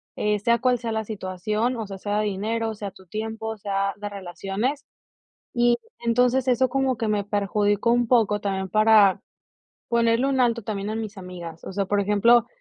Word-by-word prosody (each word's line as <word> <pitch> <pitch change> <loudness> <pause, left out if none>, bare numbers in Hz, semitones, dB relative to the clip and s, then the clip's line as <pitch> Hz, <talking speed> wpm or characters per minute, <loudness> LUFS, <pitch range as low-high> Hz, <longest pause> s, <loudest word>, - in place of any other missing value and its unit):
eh, 210 0 0
sea 235 +3 +2
cual 250 0 +2
sea 230 -1 -4
la 220 0 -1
situación". 210 +4 -2
O 225 - -3
sea, 195 - -7
sea 205 +2 -1
de 215 - 0
dinero, 220 +3 -2
sea 205 -1 -6
tu 190 0 -18
tiempo, 220 +3 -4
sea 200 -1 -1
de 205 0 -5
relaciones. 200 +8 -4 0.7
Y 240 0 +3 0.2
entonces 245 +2 +2
eso 255 +1 +3
como 265 -1 0
que 225 - -2
me 210 -1 +1
perjudicó 205 +2 +1
un 240 0 +2
poco 220 -4 +3
también 190 -2 -2
para, 215 -2 +5 0.7
ponerle 235 +2 +2
un 265 -1 +1
alto 235 -1 +2
también 205 0 -4
a - - -3
mis 215 -2 -5
amigas. 175 -3 -9
O - - -7
sea, 200 0 -1
por 205 +1 +1
ejemplo, 210 +4 +4
215 Hz, 185 wpm, -24 LUFS, 200-235 Hz, 0.7 s, para